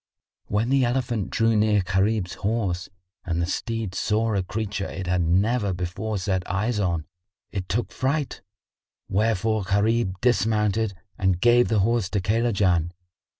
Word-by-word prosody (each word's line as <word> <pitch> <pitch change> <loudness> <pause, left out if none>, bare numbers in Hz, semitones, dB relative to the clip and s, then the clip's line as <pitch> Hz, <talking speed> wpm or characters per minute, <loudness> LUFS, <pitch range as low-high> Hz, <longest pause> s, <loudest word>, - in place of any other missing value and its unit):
When 105 +4 0
the 135 -1 +4
elephant 120 -4 -1
drew 115 0 +2
near 105 -2 +3
Gharib's 95 0 0
horse, 100 -4 -2 0.3
and 85 -1 -2
the 85 - +1
steed 110 +2 -3
saw 110 +3 0
a 100 - +1
creature 100 +1 -3
it 95 - -5
had 90 0 +1
never 100 +5 +2
before 95 +5 -3
set 95 0 0
eyes 105 +4 0
on, 85 -5 0 0.5
it 95 -3 -4
took 115 +6 -1
fright;[FN#57] 140 +2 -1 0.7
wherefore 110 +1 +1
Gharib 100 0 +1
dismounted 110 -3 +1 0.2
and 95 -2 +2
gave 120 +3 +5
the 110 -3 +2
horse 115 -2 +1
to 105 - 0
Kaylajan. 95 -5 +1
105 Hz, 145 wpm, -24 LUFS, 95-115 Hz, 0.7 s, gave